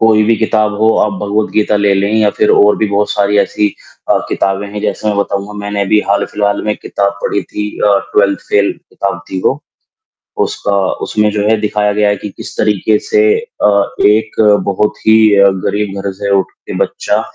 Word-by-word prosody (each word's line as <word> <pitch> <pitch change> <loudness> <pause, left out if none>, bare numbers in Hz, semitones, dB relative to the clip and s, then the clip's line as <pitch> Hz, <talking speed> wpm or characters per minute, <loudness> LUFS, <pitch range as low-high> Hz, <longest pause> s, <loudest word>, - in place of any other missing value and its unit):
कोई 110 -1 +4
भी 115 +1 +2
किताब 110 -1 +1
हो, 110 - +4
आप 105 - +1
भगवद 105 +1 -1
गीता 105 0 +1
ले 100 -1 +2
लें 100 +2 0
या 110 -2 +3
फिर - - +3
और 105 0 +4
भी 110 - 0
बहुत 100 +1 0
सारी 105 0 +1
ऐसी 105 +1 +1 0.4
अ, - - +4
किताबें 95 +1 -1
हैं, 105 +1 -6
जैसे 105 +1 -2
मैं 105 - 0
बताऊँगा, 100 0 -2
मैंने 100 0 -2
भी 105 - +4
हाल-फिलहाल 100 0 0
में 105 0 -1
किताब 100 0 -2
पढ़ी 100 - -1
थी 105 0 -5 0.2
अ, 100 -1 +4
ट्वेल्थ 100 -1 +2
फेल, 100 -1 +2 0.2
किताब 100 -1 -3
थी 95 - -3
वो, 140 - +1 0.8
उसका 425 - -2 0.3
उसमें 105 0 +1
जो 105 -1 -1
है 110 - +3
दिखाया 105 -1 0
गया 105 0 +1
है 100 - +1
कि 105 - -7
किस - - -9
तरीके 105 0 +1
से 425 - +3 0.2
अ, 475 - -2 0.4
एक 110 +1 0 0.3
बहुत 100 +2 0
ही 110 0 +6 0.2
अ, 100 0 +6 0.2
गरीब 100 -1 -2
घर 100 - -2
से 100 0 -2
उठ 95 - -3
के - - -5
बच्चा, - - -2
105 Hz, 195 wpm, -13 LUFS, 100-105 Hz, 0.8 s, ही